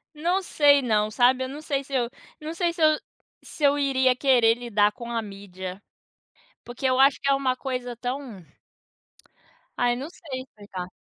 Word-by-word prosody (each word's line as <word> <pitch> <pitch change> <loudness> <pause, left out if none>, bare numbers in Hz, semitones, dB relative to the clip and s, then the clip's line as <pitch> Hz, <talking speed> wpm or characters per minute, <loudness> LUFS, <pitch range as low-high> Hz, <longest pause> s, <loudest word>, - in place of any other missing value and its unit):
Não 350 +5 0
sei 290 -5 +4
não, 215 -3 +1
sabe. 250 +4 +3
Eu - - -5
não 285 +3 -7
sei 275 -3 -2
se 275 - -15
eu 245 -2 +1 0.3
não 310 +1 -6
sei 345 0 0
se 335 -1 -5
eu 310 -1 +5 0.4
se - - -11
eu 285 0 +4
iria 260 -2 +2
querer 250 -4 +4
lidar 215 -4 +1
com 235 +2 -9
a 230 -1 -1
mídia. 195 -2 -8 0.8
Porque, 240 +2 -7
eu 255 0 +2
acho 275 +1 +5
que - - -3
é 275 - +5
uma 265 -2 0
coisa 250 -2 -4
tão 245 -6 -6 1.4
Ai, 245 0 +3
não 270 +4 -6
sei 275 -8 -7
explicar. 205 -7 -9
255 Hz, 180 wpm, -25 LUFS, 230-280 Hz, 1.4 s, eu